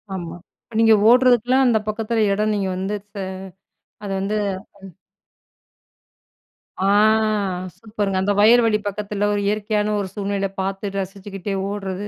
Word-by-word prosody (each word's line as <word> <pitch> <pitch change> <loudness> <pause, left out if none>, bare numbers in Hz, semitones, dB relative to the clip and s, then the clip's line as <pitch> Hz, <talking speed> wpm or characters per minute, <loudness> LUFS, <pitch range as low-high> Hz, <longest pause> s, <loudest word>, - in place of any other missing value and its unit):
ஆமா. 170 -2 -6 0.3
இப்ப 230 - -15
நீங்க 225 -1 +6 0.2
ஓடுறதுக்குலாம், 250 +1 +4
அந்த 225 -2 +3
பக்கத்தில 220 +1 0
இடம், 215 +2 0
நீங்க 195 -2 -1
வந்து 195 +3 -2 0.2
ச 205 - -10 0.9
அத 200 - -5
வந்து 200 +2 -2 0.4
அம். 195 -3 -13 1.8
ஆ 190 +1 +1 0.9
சூப்பருங்க. 210 -3 -3
அந்த 205 +2 +1
வயல்வெளி 225 0 +5
பக்கத்தில 205 0 -2
ஒரு 205 - 0
இயற்கையான 210 0 0
ஒரு 195 -2 -3
சூழ்நிலை 200 -1 -2
பார்த்து 195 +1 -4
ரசிச்சுக்கிட்டே 195 0 -5
ஓடுறது. 200 -1 -4
205 Hz, 125 wpm, -21 LUFS, 195-215 Hz, 1.8 s, நீங்க